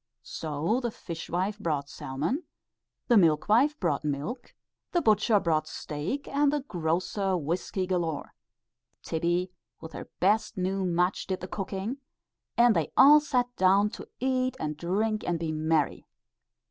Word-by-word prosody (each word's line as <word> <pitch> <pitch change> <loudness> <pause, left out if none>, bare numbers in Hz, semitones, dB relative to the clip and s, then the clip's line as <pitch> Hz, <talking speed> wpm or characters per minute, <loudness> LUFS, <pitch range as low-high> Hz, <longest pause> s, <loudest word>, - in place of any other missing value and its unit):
So 160 - -2
the 240 -2 -2
fishwife 185 +2 -4
brought 150 -7 -1
salmon, 155 - -3 0.6
the 240 - +5
milkwife 210 - +4
brought 160 -5 0
milk, 150 - -4 0.4
the 350 - +4
butcher 215 -1 +4
brought 155 -4 0
steak, 160 - -4
and 285 0 +2
the 295 -1 0
grocer 185 - -1
whiskey 175 +4 -2
galore; 175 -5 -2 0.7
Tibbie 175 +3 -1 0.3
with 160 - -10
her - - -8
best 215 +3 +2
new 190 +1 -1
mutch 180 +1 0
did 185 -1 -3
the 185 - -5
cooking, 195 +5 -4 0.6
and 235 -2 +6
they 165 -3 0
all 290 +3 +9
sat 250 -4 -1
down 195 +3 +4
to - - -9
eat 255 0 0
and 150 0 -3
to 170 - -7
drink 215 +3 0
and 175 -1 0
be 165 -1 -3
merry. 155 -1 0
185 Hz, 145 wpm, -28 LUFS, 160-225 Hz, 0.7 s, all